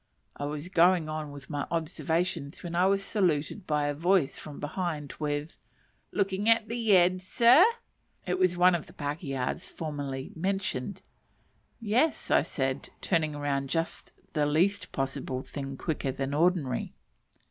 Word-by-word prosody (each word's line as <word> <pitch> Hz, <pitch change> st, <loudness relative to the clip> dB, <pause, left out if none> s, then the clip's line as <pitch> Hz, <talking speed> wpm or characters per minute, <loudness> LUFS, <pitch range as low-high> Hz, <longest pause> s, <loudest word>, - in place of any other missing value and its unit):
I 145 Hz, -, -4 dB
was 150 Hz, +2 st, -4 dB
going 175 Hz, -2 st, +4 dB
on 155 Hz, -1 st, -4 dB
with 140 Hz, -2 st, -10 dB
my 145 Hz, -2 st, -3 dB
observations 165 Hz, -2 st, -2 dB
when 170 Hz, -1 st, -5 dB
I 180 Hz, +2 st, +3 dB
was 195 Hz, 0 st, +2 dB
saluted 180 Hz, -2 st, 0 dB
by 150 Hz, -1 st, +1 dB
a 145 Hz, -, 0 dB
voice 165 Hz, -1 st, +2 dB
from 150 Hz, -2 st, -9 dB
behind 150 Hz, -2 st, -3 dB
with, 150 Hz, +1 st, -2 dB, 0.5 s
"Looking 200 Hz, +1 st, 0 dB
at 225 Hz, -1 st, +4 dB
the 230 Hz, -3 st, +2 dB
eds, 185 Hz, +1 st, +2 dB
sir?" 245 Hz, -, +7 dB, 0.6 s
It 180 Hz, 0 st, -1 dB
was 185 Hz, -1 st, +3 dB
one 180 Hz, +1 st, +6 dB
of 170 Hz, -3 st, -2 dB
the -, -, -15 dB
pakehas 145 Hz, -3 st, -3 dB
formerly 145 Hz, -4 st, -5 dB
mentioned. 190 Hz, -2 st, -2 dB, 0.8 s
"Yes," 240 Hz, +8 st, +2 dB, 0.3 s
said 135 Hz, 0 st, -2 dB
I, -, -, -33 dB
turning 155 Hz, -4 st, 0 dB
round 140 Hz, -1 st, -1 dB
just 165 Hz, +2 st, -2 dB, 0.2 s
the 150 Hz, -2 st, +2 dB
least 180 Hz, +7 st, +1 dB
possible 135 Hz, -1 st, -3 dB
thing 135 Hz, -2 st, -6 dB
quicker 145 Hz, -3 st, -2 dB
than 135 Hz, +1 st, -3 dB
ordinary. 155 Hz, -5 st, +1 dB
160 Hz, 145 wpm, -29 LUFS, 145-185 Hz, 0.8 s, sir